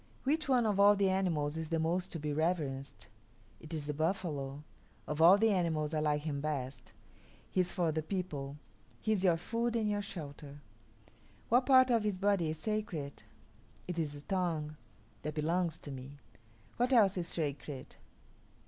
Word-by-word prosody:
Which 300 +2 0
one 250 -3 +4
of 205 -2 +1
all 205 +1 +7
the 195 -1 +2
animals 160 -6 0
is 160 -1 -4
the 165 - +1
most 170 +3 0
to 165 - -4
be 150 0 -2
reverenced? 150 -4 -2 0.5
It 160 - -12
is 155 -3 -3
the 150 - -2
buffalo; 150 -4 -2 0.4
of 150 +1 -2
all 175 +4 +9
the 220 +1 +4
animals 160 -5 0
I 155 - +1
like 150 -1 +1
him 145 -3 -2
best. 140 -3 -4 0.6
He - - 0
is 180 - +2
for 170 -3 +1
the 155 +1 -1
people; 150 -6 -4 0.4
he 220 - -1
is 200 -3 +1
your 175 -3 +4
food 230 +6 -1
and 220 -2 +1
your 205 -1 0
shelter. 145 -6 -8 0.9
What 245 +2 +4
part 260 -2 +7
of 230 -2 +3
his 210 -3 -1
body 195 -4 +2
is 155 - -3
sacred? 175 -7 -3 0.7
It 175 -2 -3
is 150 -3 -1
the 145 - -9
tongue; 165 -4 -1 0.5
that 150 +1 -4
belongs 165 +2 0
to 145 - -9
me. 135 +2 -8 0.6
What 245 +2 +2
else 205 -6 +5
is 175 -2 -2
sacred? 145 -4 -4
165 Hz, 175 wpm, -33 LUFS, 150-200 Hz, 0.9 s, all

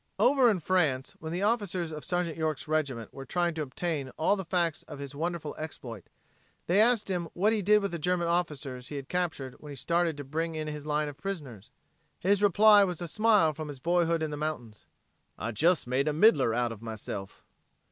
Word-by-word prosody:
Over 270 -3 +5
in 205 -5 +1
France 155 -7 +1
when 160 0 -6
the 180 +3 -2
officers 200 -6 0
of 150 -1 -7
Sergeant 175 -3 -1
York's 155 -3 -2
regiment 140 -8 -2
were 135 - -7
trying 175 +5 0
to 160 - -4
obtain 145 0 -3
all 160 +6 +3
the 190 - -4
facts 170 -3 0
of - - -8
his 140 0 -7
wonderful 160 0 -3
exploit, 125 - -7 0.6
they 190 +5 +4
asked 230 -1 +3
him 175 -4 -2
what 205 +5 +3
he 215 - 0
did 210 +2 +4
with 200 - -1
the 170 - -4
German 175 +1 0
officers 145 -7 -2
he 150 - -7
had 135 -1 -6
captured 160 -8 -2
when 150 - -11
he 145 - -7
started 170 +1 0
to 145 - -5
bring 160 +4 -3
in 155 -1 -3
his 150 0 -6
line 150 0 0
of 145 -1 -8
prisoners. 140 - -6 0.5
His 200 +2 +2
reply 205 +1 +7
was 180 -4 -2
a 175 - -4
simile 210 -4 +3
from 155 +1 -6
his 145 -2 -7
boyhood 170 +1 +1
in 155 - -2
the 150 - -4
mountains: 145 -8 -5 0.5
"I 115 +2 -4
jes 170 - +3
made 130 +4 0
a 150 - +1
middler 150 - +5
out 120 -1 +1
of 110 -2 -9
myself." 105 -3 -7
160 Hz, 210 wpm, -29 LUFS, 140-180 Hz, 0.6 s, reply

